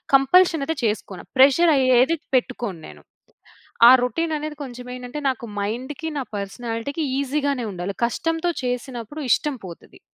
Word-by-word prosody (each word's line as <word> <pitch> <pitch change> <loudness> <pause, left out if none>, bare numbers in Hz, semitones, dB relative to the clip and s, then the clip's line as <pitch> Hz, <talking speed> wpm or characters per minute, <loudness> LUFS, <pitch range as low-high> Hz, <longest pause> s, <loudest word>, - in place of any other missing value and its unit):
Compulsion 325 +3 +4
అయితే 320 0 -2
చేసుకోను. 210 -4 -3
Pressure 285 +5 +6
అయ్యేది, 255 +4 +4 0.2
పెట్టుకోను 240 -7 -1
నేను. - - -14 0.9
ఆ - - +10
రొటీన్ 325 +6 -1
అనేది 305 0 -5
కొంచెం 250 -2 -9
ఏంటంటే, 250 +4 -7
నాకు 255 -2 -4 0.2
మైండ్‌కి, 255 +9 -4
నా - - -2
పర్సనాలిటీకి, 230 +8 -4 0.2
ఈజీగానే 280 -2 -1
ఉండాలి. 180 +2 -5
కష్టంతో 325 +8 -1
చేసినప్పుడు, 250 +3 -4
ఇష్టం 295 -3 +1
పోతది. 170 - -13
260 Hz, 130 wpm, -22 LUFS, 235-300 Hz, 0.9 s, ఆ